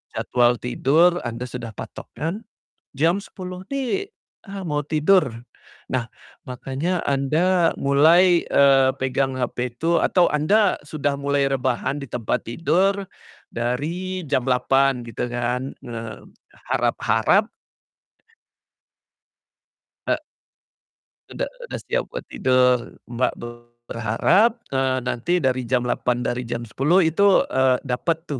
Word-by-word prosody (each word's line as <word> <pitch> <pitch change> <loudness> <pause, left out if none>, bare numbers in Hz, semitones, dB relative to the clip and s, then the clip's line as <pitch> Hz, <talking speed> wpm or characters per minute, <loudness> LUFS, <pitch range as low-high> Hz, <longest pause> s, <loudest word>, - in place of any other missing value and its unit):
jadwal 120 -1 +2
tidur, 160 +8 +2
Anda 120 +1 -5
sudah 120 -2 -7
patok - - -9
kan, 165 +4 -2 0.6
jam 165 +7 +2
10.00 185 -2 -8
nih, 275 +9 -2 0.4
ah, 195 -1 -6
mau 150 -1 -1
tidur. 155 -7 +2 0.5
Nah, 125 -2 -1 0.4
makanya 135 +8 -3
Anda 165 +6 +2
mulai, 165 +6 +5
eee, 135 -1 +5
pegang 130 0 0
hape 125 0 -2
itu 165 +6 +1
atau 180 -2 +3
Anda 195 +8 +2
sudah 145 -1 -2
mulai 140 0 +1
rebahan 130 +1 -1
di 140 - -7
tempat 115 -3 -2
tidur, 180 - +1 0.5
dari 165 +11 -3
jam 130 -3 +1
8.00 135 +1 +2
gitu 115 +1 -4
kan, 125 +2 -2
eee, 115 -3 -7 0.5
harap-harap 120 - +2 2.6
E - - +3 1.1
Udah - - -4 0.2
udah - - -5
siap - - 0
buat - - -7
tidur 125 -1 +2
Mbak, 120 +1 0 0.6
berharap, 190 - +2
eee, 130 -1 +1
nanti 155 +8 -1
dari 130 -2 0
jam 125 0 +1
8.00, 125 0 -1
dari 120 +1 -2
jam 120 0 -4
10.00 145 - +2
itu, 190 +5 +4
eee, 130 -1 +3
dapat 160 +6 -2
tuh 140 - -2
135 Hz, 115 wpm, -22 LUFS, 125-175 Hz, 2.6 s, mulai